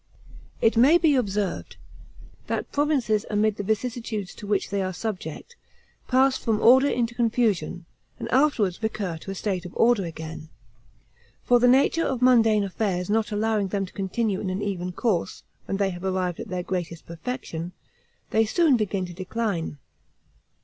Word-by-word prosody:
It 225 - +3
may 275 +9 +7
be 325 -4 +3
observed, 205 -7 -1 0.7
that - - -3
provinces 270 -8 +1
amid 210 0 +1
the 205 - -3
vicissitudes 220 -2 -3
to 205 - -10
which 205 -2 0
they 200 -1 0
are 185 0 -2
subject, 205 - -6 0.5
pass 265 +1 +3
from 220 -3 0
order 260 +5 +6
into 235 -1 -1
confusion, 225 -7 0 0.3
and - - -5
afterward 250 -10 +2
recur 205 -6 -2
to 195 - -10
a 195 - -4
state 190 -2 -2
of 180 - -10
order 230 -3 +4
again; 160 -1 -7 0.9
for 245 0 +4
the 245 - +4
nature 275 +6 +4
of 260 -3 -1
mundane 225 -4 +4
affairs 190 -1 -2
not 220 0 +1
allowing 210 -1 0
them 195 +1 -2
to 185 - -14
continue 200 +1 -1
in 195 - -3
an 190 +2 -3
even 180 -3 -3
course, 190 -2 -1 0.2
when 195 - -2
they 195 -1 +1
have 175 0 -8
arrived 185 -2 -1
at - - -6
their 180 0 -3
greatest 175 -3 -4
perfection, 170 -2 -5 0.6
they 220 - +4
soon 290 +4 +3
begin 200 -3 -1
to 175 - -9
decline. 185 -3 -3
210 Hz, 165 wpm, -25 LUFS, 185-240 Hz, 0.9 s, may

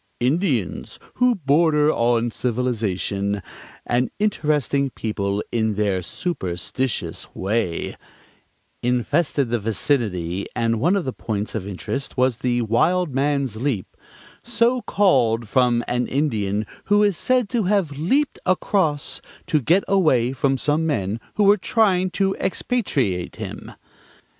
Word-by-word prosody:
"Indians 130 - 0 0.2
who 250 -1 +4
border 150 -2 +3
on 120 -1 +1
civilization, 105 -5 -1 0.4
an 120 0 +1
interesting 150 - +1
people 105 -4 -2
in 110 -2 0
their 100 -3 0
superstitious 115 - -3
way," 95 -3 -1 0.9
infested 125 +2 +1
the 120 - +1
vicinity, 100 - -1
and 115 -2 +1
one 175 - +3
of 195 - -1
the 130 - -3
points 105 -2 -3
of 100 -3 -4
interest 135 +9 -4
was 125 -2 +2
the 120 0 0
Wild 155 - +1
Man's 135 -4 0
Leap, 120 -6 -2 0.5
"so 240 +1 +1
called 120 - +2
from 120 0 +2
an 125 0 0
Indian 110 -8 0 0.2
who 205 0 +4
is 205 -3 +2
said 255 +4 +1
to 235 -5 0
have 190 -5 +1
leaped 190 - 0
across 155 -7 0 0.2
to 155 - +1
get 175 +10 +3
away 155 -11 +3
from 135 +1 0
some 150 +4 +1
men 110 -7 -1 0.2
who 210 - +2
were 205 +1 +6
trying 185 -2 +2
to 195 +1 0
expatriate 135 - -1
him." - - -7
130 Hz, 125 wpm, -22 LUFS, 110-175 Hz, 0.9 s, were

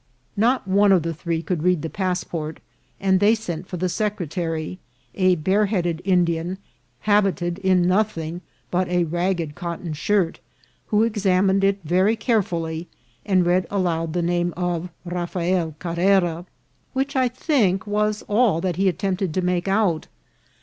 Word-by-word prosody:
Not 235 +1 +2
one 200 +1 +4
of 185 -4 +4
the 165 0 -2
three 165 +1 -3
could 175 -3 -2
read 180 -2 +2
the - - -1
passport, 180 -4 -3 0.4
and 190 -1 +3
they 210 +3 +5
sent 180 -5 -5
for 180 - -5
the 185 +2 0
secretary, 175 -3 -3 0.3
a 185 -1 +3
bare 190 +6 +2
headed 175 -5 -1
Indian, 175 -1 +1 0.4
habited 195 -4 +1
in 185 -2 +3
no 185 +4 +4
thing 170 -5 -5 0.3
but 180 +1 +1
a 180 0 +1
ragged 170 -1 -1
cotton 170 -1 -5
shirt, 175 +2 0 0.5
who 210 +1 +3
examined 195 -3 +2
it 195 0 +3
very 185 +7 +2
carefully, 175 -8 -1 0.4
and 185 -3 +3
read 180 +1 +2
aloud 165 -5 -1
the 175 - 0
name 175 0 0
of 175 -1 -2 0.2
Rafael 175 -1 -1
Carrera, 175 0 +1 0.5
which, 275 +1 -1
I 260 -1 +3
think, 235 - +1
was 210 0 0
all 210 -5 +3
that 175 -1 -2
he 195 0 +3
attempted 185 -1 -2
to 185 - +1
make 180 0 0
out. 195 -5 +1
180 Hz, 150 wpm, -23 LUFS, 170-200 Hz, 0.5 s, they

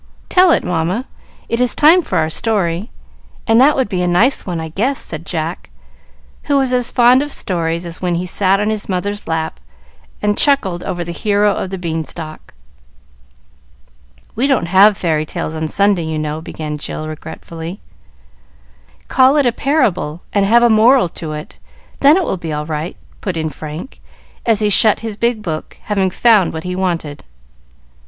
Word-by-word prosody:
"Tell 365 0 +5
it, - - +3
Mamma. 180 +8 -1 0.4
It 230 +1 -1
is 250 - +2
time 325 +5 +6
for - - -3
our 160 -1 +2
story, 195 -1 -1 0.6
and 225 +1 +4
that 290 +3 +5
would 260 -4 +1
be 185 -3 -2
a 180 - 0
nice 215 +11 +2
one, 175 -2 -3
I 160 0 -5
guess," 240 - -1
said 160 +1 -5
Jack, 165 0 -4 0.8
who 285 -1 +2
was 265 -2 +1
as 250 -1 +1
fond 245 +1 +5
of 290 0 -4
stories 170 -4 -2
as 170 -1 -8
when 180 -2 0
he 175 +2 -2
sat 195 +2 +2
in 210 +1 0
his 215 -2 -4
mother's 205 +2 -3
lap 160 -1 -3 0.6
and 210 0 0
chuckled 195 -12 +2
over 175 -1 -3
the 170 - -6
hero 205 +2 +1
of 190 - -4
the 190 - -5
beanstalk. 160 - -6 1.8
"We 255 +5 0
don't 270 -10 +1
have 195 +3 +5
fairy 155 -3 0
tales 155 0 -5
on 160 0 -3
Sunday, 195 -1 +2
you 160 -1 -3
know," 155 0 -3
began 150 -2 -6
Jill 155 +1 -5
regretfully. 165 +3 -8 1.3
"Call 265 +3 +4
it 285 - +3
a 245 - +3
parable, 225 - 0
and 200 -1 +2
have 235 +3 +5
a 240 - +5
moral 220 -2 +5
to 160 -2 -7
it, 150 0 -9 0.4
then 290 +5 +6
it 380 - +1
will 190 - -2
be 165 -2 -6
all 150 0 -3
right," 155 +2 -4 0.2
put 185 -4 -3
in 160 -1 -2
Frank, 155 - -8 0.5
as 225 -2 +3
he 210 - +2
shut 215 +2 +5
his 225 -2 -5
big 235 0 -1
book, 160 -4 -5
having 195 -3 0
found 210 -1 +3
what 160 0 -5
he 180 0 -4
wanted. 170 -6 -3
185 Hz, 180 wpm, -17 LUFS, 165-230 Hz, 1.8 s, time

